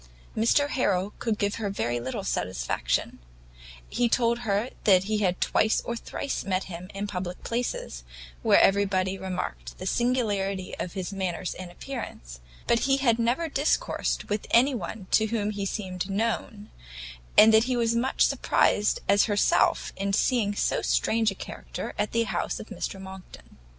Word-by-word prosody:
Mr 260 +6 +3
Harrel 200 -7 0
could 225 -3 -1
give 205 0 -1
her 205 - -1
very 120 -11 -1
little 130 +2 -4
satisfaction: - - -1 0.7
he 240 -1 +1
told 235 0 +2
her 220 +1 -1
that 190 -3 +6
he 210 +1 -1
had 185 -3 +1
twice 220 - +2
or 235 - -4
thrice 270 +3 -4
met 190 -1 -1
him 180 0 -8
in 200 +1 -2
public 180 -3 -5
places, 230 - -3 0.4
where - - +5
everybody 195 -1 +3
remarked - - -5
the - - -7
singularity 205 -6 0
of 180 - -4
his 190 0 -4
manners 185 -1 -2
and 185 0 -8
appearance, 175 - -7 0.3
but 235 - +3
that - - -3
he 270 0 +3
had 240 -4 +2
never 240 +8 +1
discoursed 305 - 0
with 210 0 -2
anyone 235 -5 +1
to 220 - +4
whom 210 -2 -1
he 200 -1 -3
seemed 190 -2 -4
known; 210 0 -2 0.7
and 220 +1 +9
that 220 +1 +6
he 255 -1 0
was 230 -1 +2
as - - 0
much 260 +3 +2
surprised 210 0 +2
as 200 0 +5
herself 205 -2 +2
in 195 +1 -2
seeing 210 -2 +2
so - - 0
strange 225 -1 +2
a 195 - -5
character - - -7
at 210 - 0
the 230 0 +2
house - - -2
of - - -9
Mr 195 - -5
Monckton. 190 - -12
205 Hz, 165 wpm, -27 LUFS, 185-230 Hz, 0.7 s, and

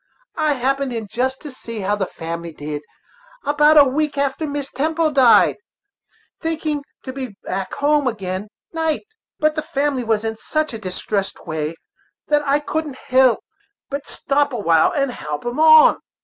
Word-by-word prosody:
I 305 -1 +3
happened 270 +1 0
in 225 -2 -4
just 255 +5 -2
to 295 - -8
see 230 -4 -7
how 200 +2 +1
the 195 -3 -2
family 170 0 -6
did, 150 0 -5 0.6
about 295 +1 +5
a 290 - +10
week 290 +2 -1
after 280 +3 0
Mrs. 285 -1 -4
Temple 315 +2 0
died, 265 -5 +5 0.8
thinking 310 -3 -2 0.2
to 260 - -6
be 255 -6 -6
back 190 0 -4
home 290 -1 +2
agin' 195 -3 -3 0.3
night; 320 0 -1 0.3
but 305 0 +2
the 310 - -2
family 280 -3 -1
was 220 -1 0
in 220 0 -2
such 310 +3 -2
a 225 - -5
distressed 195 +1 -3
way 155 0 -3 0.5
that 295 0 +4
I 280 +1 +3
couldn't 300 -2 -3 0.9
but 280 0 -4
stop 285 0 0
awhile 170 -8 +3
and 275 -3 0
help 150 -7 -6
em 240 +4 -3
on. 315 0 +7
270 Hz, 160 wpm, -20 LUFS, 210-295 Hz, 0.9 s, a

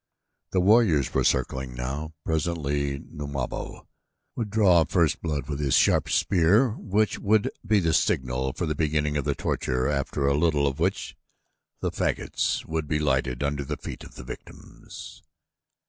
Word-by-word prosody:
The 95 - +1
warriors 95 - +4
were - - +2
circling 65 0 0
now. 70 +6 -4
Presently 75 -3 -1
Numabo 70 -3 -6 0.5
would 115 -3 -3
draw 95 -6 +5
first 80 0 +1
blood 75 -4 -3
with 75 -2 -4
his 70 -3 +1
sharp - - +3
spear 100 +7 +3
which 105 0 0
would 105 +1 +2
be 105 -2 +3
the 85 -3 +1
signal 65 -3 +1
for 85 - -3
the 75 - -1
beginning 75 -1 0
of 70 -2 -1
the - - 0
torture 65 0 -1
after 70 -1 -1
a 70 - +3
little 75 -1 +2
of 70 +1 -1
which 95 +4 -1 0.7
the - - -1
fagots - - -1
would 80 -1 -3
be 75 - 0
lighted 65 -3 0
around 70 0 -1
the 70 +1 -4
feet - - -8
of - - -13
the - - -9
victims. - - -11
75 Hz, 160 wpm, -26 LUFS, 70-85 Hz, 0.7 s, draw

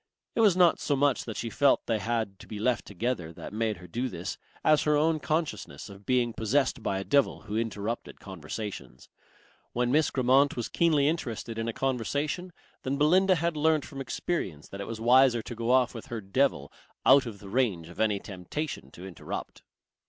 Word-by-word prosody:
It - - -3
was 205 -5 +5
not 175 -2 +5
so 145 - 0
much 140 -1 +2
that 110 - -6
she 115 - -3
felt 140 -2 +3
they 115 -2 0
had 110 -3 -2
to - - -13
be 105 - -6
left 115 +1 0
together 100 -4 -2
that - - -9
made 110 -1 -1
her 90 - -12
do 120 +9 -3
this 90 +1 -5 0.2
as 155 -1 +5
her 150 -1 +3
own 155 +1 +2
consciousness 150 - -3
of 100 0 -14
being 125 -2 +2
possessed 130 +3 +1
by 100 -2 -1
a 95 - -3
devil 140 +5 +2
who 105 - -6
interrupted 110 0 -3
conversations. 95 - -7 0.6
When 120 0 +1
Miss 155 +2 +3
Grammont 135 +2 +3
was 120 - -3
keenly 155 -4 +3
interested 115 -8 -3
in 115 - -2
a - - 0
conversation, 140 +8 -2 0.3
then 135 +1 -2
Belinda 185 +6 +4
had 170 0 -1
learnt 155 0 +2
from 135 -2 -7
experience 110 - -3
that 100 - -7
it 100 - -5
was 115 -1 -5
wiser 120 0 +5
to - - -7
go 115 0 -3
off 125 -1 +4
with 115 - -8
her 115 - -4
devil 100 - 0 0.3
out 140 -2 +6
of 110 -3 -7
the 100 - -12
range 100 -9 0
of 85 - -13
any 105 -2 +2
temptation 100 - -5
to 90 - -10
interrupt. 95 -3 -7
120 Hz, 195 wpm, -28 LUFS, 105-145 Hz, 0.6 s, out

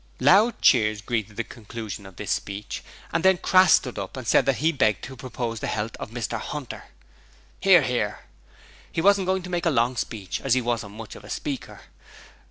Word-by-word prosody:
Loud 215 +5 +5
cheers 110 -3 +4
greeted 105 0 -3
the 115 - -2
conclusion 110 -3 -8
of 95 - -14
this - - -5
speech, 100 +1 -4 0.3
and 165 +1 0
then 190 -1 +5
Crass 185 -1 +5
stood 125 -5 +1
up 100 +6 -6
and 130 -3 -7
said - - +4
that 135 - +3
he 160 +8 +2
begged 110 - +1
to 130 - -7
propose 120 -2 -4
the - - -3
health 105 +1 -3
of - - -7
Mr 120 +1 -4
'Unter. 145 -5 -7 0.7
(Hear, 185 -5 +6
hear.) 115 -5 -1 0.7
He - - -2
wasn't 195 +1 +4
going 190 0 0
to 180 - -8
make 175 -1 0
a - - +5
long 125 -3 +2
speech 105 -6 -4
as 135 -2 +2
he - - +3
wasn't 115 -4 -3
much 110 -1 -8
of - - -12
a - - -12
speaker. - - -5
120 Hz, 200 wpm, -25 LUFS, 110-165 Hz, 0.7 s, Hear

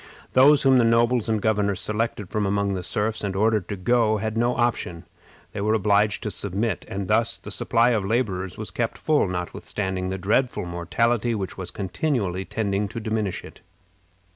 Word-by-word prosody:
Those 140 +3 +6
whom 135 -1 +5
the 120 - +5
nobles 115 0 +3
and 110 -1 +1
governors 100 -3 +1
selected 105 -3 -3
from 105 -2 0
among 100 0 0
the 95 - -3
serfs 105 +5 -2
and 100 -2 -2
ordered 105 -1 +2
to 100 - -2
go 110 +2 +2
had 110 +1 -3
no 120 +2 +1
option; 90 -8 -1 0.5
they 100 - -5
were 110 +2 +2
obliged 105 -1 +2
to 105 - -2
submit. 100 +1 -2
And 95 -1 -4
thus 110 +2 +2
the - - -10
supply 120 +1 +2
of 110 -4 +1
laborers 95 -4 -1
was 110 - -6
kept 120 -2 -2
full, 155 -8 +2
notwithstanding 95 +1 -3
the 95 - -3
dreadful 105 +5 0
mortality 115 +7 0
which 95 -3 -4
was 95 -2 -6
continually 95 - -2
tending 100 -2 -1
to 110 +3 -6
diminish 110 -3 -2
it. - - -13
105 Hz, 180 wpm, -24 LUFS, 95-115 Hz, 0.5 s, Those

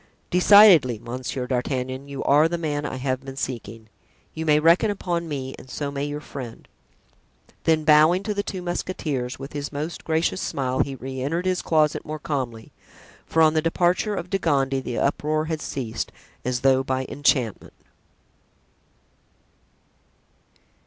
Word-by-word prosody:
"Decidedly, 180 - +7
Monsieur 125 +3 -5
d'Artagnan, 130 +1 -2
you 140 -1 -5
are 150 +3 +5
the 170 +1 -2
man 150 -3 -2
I - - -5
have 130 0 -2
been 135 0 -8
seeking. 115 -5 -5 0.5
You 160 0 -5
may 150 0 +5
reckon 170 +7 +4
upon 175 -4 -2
me 135 -2 -4
and 130 - -14
so 140 +2 -4
may 140 0 -3
your 145 0 -4
friend." 130 -6 -9 1.0
Then 160 -1 +3
bowing 155 +5 +5
to 210 - -2
the 200 - -1
two 190 -3 -6
musketeers 150 -8 -3
with 135 +2 -9
his 145 0 -4
most 150 +3 -5
gracious 160 +3 0
smile, 130 -2 -2
he 135 - 0
re 130 0 -6
entered 165 +7 -1
his 185 -1 0
closet 155 -2 +1
more 155 +1 -5
calmly, 130 -7 -4 0.6
for 160 - +3
on 155 -1 +5
the 155 - +2
departure 180 +5 +1
of 180 -1 -5
De 195 - +1
Gondy 135 -5 +1
the 125 -2 -5
uproar 155 +2 0
had 160 -1 -3
ceased 115 -5 -4 0.3
as 125 -1 -1
though 130 -1 +4
by 130 0 -2
enchantment. 130 -6 0
145 Hz, 155 wpm, -24 LUFS, 130-165 Hz, 1.0 s, Decidedly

